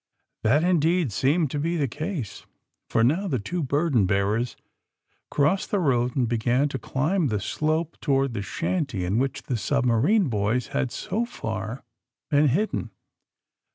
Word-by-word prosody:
f 110 - +2
That, 145 +6 +4
indeed, 170 -4 +2
seemed 140 - +1
to 145 - -2
be 165 +4 0
the 145 -3 +1
case, 150 - -5 0.4
for 115 - +2
now 165 - +2
the 140 -8 0
two 170 - -3
burden 140 - +2
bearers 105 +5 0 0.7
crossed 150 +7 +1
the 205 - +1
road 125 -8 +1
and 125 -4 +2
began 120 +4 +1
to 135 - -4
climb 155 - 0
the 105 -4 -1
slope 155 +9 -1
toward 135 -3 +1
the 105 - -3
shanty 140 - -2
in 100 +6 +1
which 135 0 -2
the 125 - -2
submarine 140 - +2
boys 110 +1 0
had 125 - -1
so 225 +4 -2
far 110 - -5 0.5
been 145 +1 +4
hid 195 - +1
den. - - -3
135 Hz, 160 wpm, -25 LUFS, 115-165 Hz, 0.7 s, That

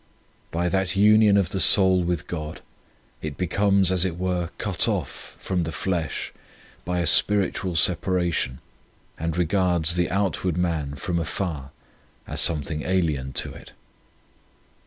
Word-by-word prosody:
By 85 +1 -2
that 95 +1 -1
union 105 0 +5
of 95 -3 0
the 95 - -3
soul 95 -2 +5
with 90 0 -2
God 80 -2 -7 0.6
it 75 -3 -6
becomes, 95 +1 +1
as 90 -2 +2
it 90 -3 -3
were, 90 -2 -2
cut - - +1
off - - -5
from 95 -2 -3
the 80 -1 -3
flesh 85 -2 -3 0.5
by 90 0 -2
a - - -1
spiritual 95 +1 +4
separa 90 +1 0
tion, 65 -3 -3 0.6
and 80 +1 -3
regards 90 -2 +1
the 90 0 -1
outward 95 -3 -1
man 80 -5 -2
from 85 +5 -3
afar 80 -4 -4 0.6
as - - -1
something 75 -1 +3
alien 80 -8 -1
to - - -3
it. - - -14
90 Hz, 140 wpm, -23 LUFS, 80-95 Hz, 0.6 s, union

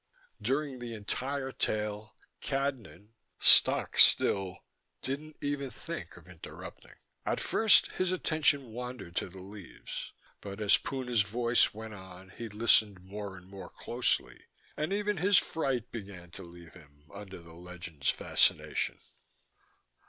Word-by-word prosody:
During 135 -1 -1
the 120 -1 -6
entire 130 +6 -3
tale, 105 -2 -3 0.3
Cadnan, 120 - -3 0.3
stock - - +6
still, 95 -2 +5 0.5
didn't 150 +3 -5
even 145 -1 -2
think 170 - -8
of 85 -1 -16
interrupting. 90 -3 -11 0.3
At - - -1
first 220 -2 +5
his 185 -1 -1
attention 155 -7 +1
wandered 125 -7 -7
to - - -1
the 90 +1 -11
leaves, 100 -2 -9 0.3
but 100 0 -8
as 105 -1 +5
Puna's 125 -5 -1
voice 115 +4 +3
went 110 0 -8
on 95 -1 -12
he 115 +4 -8
listened 105 -3 +3
more 100 0 -7
and 90 - -14
more 95 -2 -10
closely, 120 +1 -2 0.3
and 155 +4 -2
even 205 0 0
his 195 +3 +4
fright 135 -8 -1
began 95 -6 -9
to - - -10
leave 85 -1 -13
him 75 -4 -19
under 100 -2 -9
the 85 -1 -14
legend's 85 -5 -5
fascination. - - +1
105 Hz, 130 wpm, -30 LUFS, 95-135 Hz, 0.5 s, stock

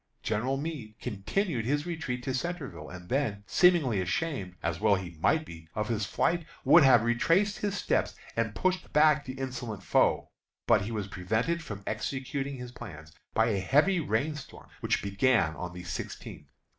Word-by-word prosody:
General 120 +5 0
Meade 140 -8 -5
continued 125 - -1
his 145 +4 0
retreat 140 -8 -3
to 130 - -2
Centreville, 135 - -4
and 90 0 -10
then, 110 -5 -1
seemingly 135 - +4
ashamed 95 - -2
as 85 0 -1
well 105 -1 +4
he 90 -3 -6
might 155 - +2
be 80 - -11
of 105 0 -1
his 105 -4 0
flight, 170 0 +1 0.2
would 170 - +8
have 130 -5 +6
retraced 165 - +2
his 205 -1 -1
steps - - 0 0.2
and 110 -2 -1
pushed 185 +8 0
back 150 -1 +5
the 130 - -5
insolent 120 -6 -5
foe, - - +2 0.3
but - - +5
he 105 +4 -4
was 105 -3 -3
prevented 110 - -1
from 105 -10 -7
executing 135 +4 -3
his 125 -1 -7
plans 80 -9 -10 0.2
by 110 +1 +4
a 100 -3 +1
heavy 150 - +3
rain 145 +2 0
storm, 150 - -11
which - - 0
began 100 -4 +2
on 90 -1 -5
the 90 0 -8
sixteenth. 80 -6 -6
120 Hz, 170 wpm, -29 LUFS, 100-150 Hz, 0.3 s, would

